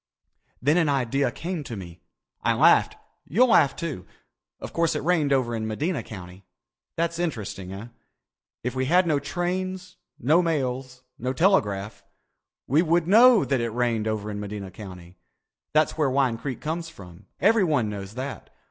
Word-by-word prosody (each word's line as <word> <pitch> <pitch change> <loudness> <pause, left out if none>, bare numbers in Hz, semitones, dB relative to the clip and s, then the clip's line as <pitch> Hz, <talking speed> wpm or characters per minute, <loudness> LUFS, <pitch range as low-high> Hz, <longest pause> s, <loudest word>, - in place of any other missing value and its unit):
"Then 150 +5 +3
an 165 -4 +3
idea 135 0 +1
came 170 +3 -4
to 120 -4 -7
me. 85 -3 -10 0.4
I - - +2
laughed. - - +4 0.3
You'll 240 - +4
laugh, 145 -10 +4
too. 150 - -5 0.5
Of - - -8
course 170 -1 +1
it - - -2
rained 160 -4 +2
over 130 -3 +1
in 110 -1 -3
Medina 150 +10 -2
County. 90 -2 -10 0.5
That's 170 0 -1
interesting, 105 - -4
eh? 100 +5 -8 0.7
If 125 - -2
we 130 0 -1
had 175 +6 +4
no 155 -4 +2
trains, 185 +4 -3 0.2
no 155 +8 +4
mails, 130 -5 -2 0.2
no 125 +2 -2
telegraph, 110 - +1 0.6
we 145 +6 +3
would 170 0 +1
know 230 +2 +7
that 135 -3 0
it 115 - -1
rained 115 -2 0
over 105 -1 -2
in 105 - -5
Medina 100 -2 -6
County. 90 -2 -11 0.5
That's 155 +1 +2
where 150 -3 +3
Wine 130 -3 +1
Creek 130 -3 -5
comes 165 +2 -3
from. 95 - -14
Everyone 165 - +3
knows 100 0 -6
that. 130 -2 -6
135 Hz, 160 wpm, -25 LUFS, 110-165 Hz, 0.7 s, know